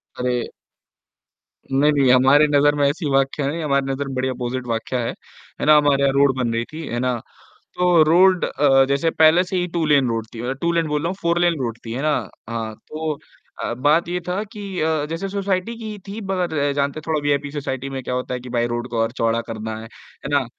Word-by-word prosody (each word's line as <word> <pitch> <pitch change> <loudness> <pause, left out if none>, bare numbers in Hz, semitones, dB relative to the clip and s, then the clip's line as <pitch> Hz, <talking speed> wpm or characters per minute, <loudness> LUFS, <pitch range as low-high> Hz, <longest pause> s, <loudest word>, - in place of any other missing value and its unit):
अरे! 125 -1 -1 1.2
नहीं, 145 +3 +4
नहीं 140 -3 +3
हमारे 135 +4 +6
नज़र 145 0 +3
में 145 -1 +3
ऐसी 150 0 -3
वाकया 135 +1 +1
नहीं, 160 +3 -3
हमारे 140 -2 +1
नज़र 140 +1 -3
में 135 - -5
बड़ी 130 +1 0
ऑपोजिट 125 0 -4
वाकया 115 +2 -2
है, 115 - -1 0.5
है - - -1
ना, 155 0 +7
हमारे 145 -2 +3
यहाँ 135 -1 +3
रोड 140 -1 +3
बन 120 -3 0
रही 115 +1 -1
थी, 160 0 -6
है 120 - -3
ना। 125 0 0 0.6
तो 180 -2 +4
रोड 180 +4 +5
अ, 135 -2 +4
जैसे 140 +4 +1
पहले 160 +3 +5
से 185 +1 -4
ही 180 - 0
टू 170 - +1
लेन 140 -4 +4
रोड 115 -1 -2
थी, 115 - -6
मतलब 130 +2 -3
टू 170 0 +1
लेन 165 -1 +1
बोल 150 0 -1
रहा 165 - 0
हूँ 185 - -2
फोर 170 0 +1
लेन 175 -1 +3
रोड 115 -2 -3
थी, 115 - -5
है 130 - -3
ना। 155 0 +2 0.4
हाँ, 115 -1 -4
तो 155 -1 -3 0.4
अ, - - -2
बात 150 +7 +2
ये 180 +1 -2
था 185 +4 -1
कि 200 -3 -5
अ, 155 -1 +1
जैसे 170 +4 -3
सोसाइटी 195 +2 -2
की 215 -2 -6
थी 210 +3 -6
मगर 180 -4 -1
अ, - - 0
जानते 140 +2 -1
थोड़ा 155 -2 0
वीआईपी 145 0 0
सोसाइटी 135 -2 -4
में 135 -1 -5
क्या 125 - -3
होता 125 0 -3
है 125 - -4
कि 125 - -10
भाई 120 - +2
रोड 120 +1 -3
को 115 - -2
और 115 0 -1
चौड़ा 115 0 +2
करना 110 0 -5
है, - - -9
है 115 +4 -12
ना, 140 -2 +2
145 Hz, 235 wpm, -21 LUFS, 125-165 Hz, 1.2 s, ना